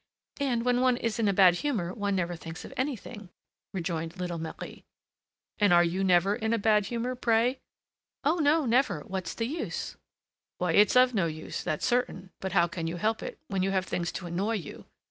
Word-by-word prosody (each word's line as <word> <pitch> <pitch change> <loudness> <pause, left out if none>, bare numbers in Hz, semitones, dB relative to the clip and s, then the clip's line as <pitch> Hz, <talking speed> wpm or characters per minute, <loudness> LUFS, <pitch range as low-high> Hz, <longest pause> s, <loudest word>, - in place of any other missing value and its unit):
"And 250 -4 0
when 250 0 +2
one 255 -1 +3
is 230 -1 -2
in 220 - +2
a - - +4
bad 185 -2 +6
humor, 200 -11 -1
one 200 -1 -1
never 175 -2 -1
thinks 165 0 -8
of - - -10
anything," 245 -6 -4 0.4
rejoined 165 -2 -3
little 175 -2 -3
Marie. 160 0 -7 0.8
"And 205 -3 +4
are 175 0 +7
you 175 +3 0
never 190 +2 +4
in 220 -1 -1
a - - +2
bad 210 -1 +3
humor, 240 +1 -2
pray?" 245 +1 +1 0.6
"Oh! 305 +5 +2
no, 305 0 +3
never! 235 - +2
What's 185 +1 -5
the 230 - -1
use?" 305 +8 -4 0.6
"Why, 180 -1 0
it's 205 +6 +5
of 250 0 +6
no 190 -6 +2
use, 155 0 -5
that's 155 - -2
certain; 240 -7 -1
but 190 -1 -4
how 170 -3 +4
can 170 -2 -4
you 165 - -3
help 220 +4 0
it, - - -6
when 195 -1 -1
you 190 - +1
have 190 -1 0
things 175 -2 -2
to 185 - -5
annoy 185 +6 -1
you? 185 -8 -7
200 Hz, 205 wpm, -28 LUFS, 175-240 Hz, 0.8 s, are